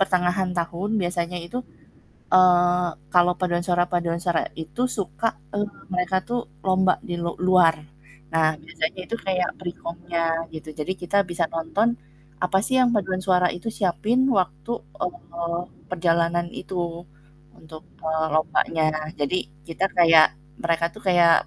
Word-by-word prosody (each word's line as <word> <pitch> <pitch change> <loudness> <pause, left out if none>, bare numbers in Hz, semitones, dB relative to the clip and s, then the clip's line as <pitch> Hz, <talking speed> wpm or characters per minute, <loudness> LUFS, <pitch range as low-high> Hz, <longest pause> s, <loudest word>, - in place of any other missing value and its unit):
pertengahan 180 0 +2
tahun 175 +6 -1
biasanya 175 0 -2
itu, 245 +8 -5 0.7
eee, 180 -1 +5 0.3
kalau 180 0 +6
paduan 175 -1 0
suara 175 -1 +2
paduan 170 -1 -1
suara, 175 -2 +1
itu 160 +9 -3
suka, 215 +3 -1 0.3
eee, 205 0 +1 0.3
mereka 180 +1 +1
tuh 240 0 0 0.3
lomba 185 0 +4 0.2
di 175 - -2
lu 170 0 -2
luar. 180 -3 +5 0.6
Nah, 165 -1 +4
biasanya 160 +3 -4
itu 230 - -2
kayak 180 -2 +1
perikomnya 170 -1 -4 0.3
gitu, 155 0 -8
jadi 170 +5 -1
kita 175 - -1
bisa 170 - 0
nonton, 200 +9 0 0.5
apa 190 +1 +2
sih 260 +5 +1
yang 255 - +5
paduan 185 -2 0
suara 180 -2 +4
itu 175 +6 -5
siapin 210 +5 +1
waktu, 185 - 0 0.3
eee, 170 - -3 0.3
perjalanan 170 -1 +1
itu 190 - -7 0.8
untuk, 155 0 -12 0.2
eee, 160 0 +1
lombanya. 155 +1 +1 0.4
Jadi 145 +5 +1 0.3
kita 165 +3 -1
kayak 165 -2 +8 0.4
mereka 170 0 +1
tuh 215 - -11
kayak, 175 -2 +6
175 Hz, 135 wpm, -24 LUFS, 170-185 Hz, 0.8 s, kayak